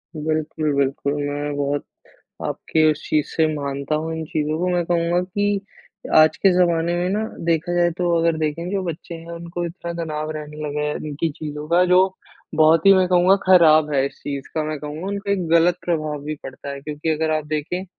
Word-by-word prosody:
बिल्कुल, 155 Hz, 0 st, -1 dB
बिल्कुल 140 Hz, +1 st, 0 dB
मैं 145 Hz, 0 st, -3 dB
बहुत 145 Hz, 0 st, -1 dB, 0.6 s
आपके 160 Hz, -1 st, 0 dB
उस 155 Hz, 0 st, -4 dB
चीज़ 150 Hz, -1 st, +1 dB
से 160 Hz, -, +1 dB
मानता 140 Hz, 0 st, -3 dB
हूँ 160 Hz, +1 st, -3 dB
इन 160 Hz, -, -4 dB
चीज़ों 155 Hz, 0 st, -2 dB
को 180 Hz, +2 st, 0 dB
मैं 175 Hz, -1 st, +1 dB
कहूँगा 170 Hz, 0 st, +1 dB
कि 205 Hz, +2 st, -1 dB, 0.6 s
आज 155 Hz, 0 st, +6 dB
के 195 Hz, -, +4 dB
ज़माने 170 Hz, -1 st, +2 dB
में 175 Hz, +1 st, 0 dB
ना 210 Hz, +2 st, 0 dB, 0.2 s
देखा 165 Hz, +1 st, 0 dB
जाए 175 Hz, 0 st, +3 dB
तो 175 Hz, -1 st, +1 dB
अगर 165 Hz, -1 st, +2 dB
देखें 160 Hz, +2 st, -2 dB
जो 195 Hz, -1 st, -1 dB
बच्चे 170 Hz, 0 st, -6 dB
हैं 165 Hz, 0 st, -10 dB
उनको 170 Hz, +1 st, -5 dB
इतना 170 Hz, 0 st, -6 dB
तनाव 155 Hz, -1 st, -4 dB
रहने 150 Hz, 0 st, -8 dB
लगा 150 Hz, 0 st, -3 dB
है, 150 Hz, -, -2 dB
इनकी 155 Hz, +2 st, -3 dB
चीजों 150 Hz, 0 st, -7 dB
का 175 Hz, +2 st, +4 dB
जो 180 Hz, 0 st, +5 dB, 0.5 s
बहुत 155 Hz, +2 st, +4 dB
ही 195 Hz, -, +10 dB
मैं 185 Hz, -1 st, +4 dB
कहूँगा 180 Hz, +2 st, +5 dB
खराब 155 Hz, -4 st, +6 dB
है 135 Hz, -2 st, +2 dB
इस -, -, -10 dB
चीज़ 140 Hz, -2 st, -5 dB
का, 155 Hz, -, +1 dB
मैं 155 Hz, 0 st, -3 dB
कहूँगा 150 Hz, +4 st, -6 dB
उनका 200 Hz, 0 st, -2 dB
एक 185 Hz, -4 st, -1 dB
गलत 170 Hz, +2 st, +4 dB
प्रभाव 155 Hz, -4 st, -1 dB
भी 155 Hz, +1 st, -3 dB
पड़ता 135 Hz, +1 st, -8 dB
है। 140 Hz, 0 st, -6 dB
क्योंकि 150 Hz, +2 st, -5 dB
अगर 160 Hz, 0 st, 0 dB
आप 155 Hz, -1 st, -4 dB
देखेें 155 Hz, +5 st, -3 dB
160 Hz, 205 wpm, -22 LUFS, 150-175 Hz, 0.6 s, ही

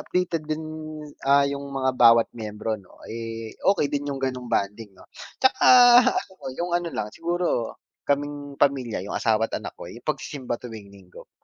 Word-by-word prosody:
updated 180 Hz, -3 st, -1 dB
din, 155 Hz, 0 st, -2 dB, 0.7 s
ah, 140 Hz, 0 st, +6 dB
yung 140 Hz, 0 st, -4 dB
mga 130 Hz, -1 st, 0 dB
bawat 115 Hz, -1 st, +6 dB
miyembro 110 Hz, 0 st, -4 dB
no 95 Hz, -, -21 dB
eh, 115 Hz, -1 st, -6 dB
okay 195 Hz, -6 st, +3 dB
din 145 Hz, -, 0 dB
yung 140 Hz, -1 st, -3 dB
ganong 130 Hz, -2 st, -3 dB
bonding 105 Hz, +2 st, -1 dB
no. -, -, -16 dB, 0.3 s
Tsaka 260 Hz, -, +2 dB, 1.0 s
yung 175 Hz, 0 st, -1 dB
ano 175 Hz, -1 st, 0 dB
lang 105 Hz, -, -3 dB
siguro 170 Hz, -8 st, -1 dB, 0.2 s
kaming 145 Hz, 0 st, -2 dB
pamilya 135 Hz, -5 st, +1 dB
yung -, -, -5 dB
asawa 110 Hz, 0 st, +2 dB
at -, -, -7 dB
anak -, -, -8 dB
ko -, -, -8 dB
yung 115 Hz, +7 st, -11 dB
pagsisimba 135 Hz, -4 st, -3 dB
tuwing 110 Hz, -5 st, -10 dB
Linggo, 95 Hz, -2 st, -15 dB
130 Hz, 165 wpm, -25 LUFS, 115-145 Hz, 1.0 s, ah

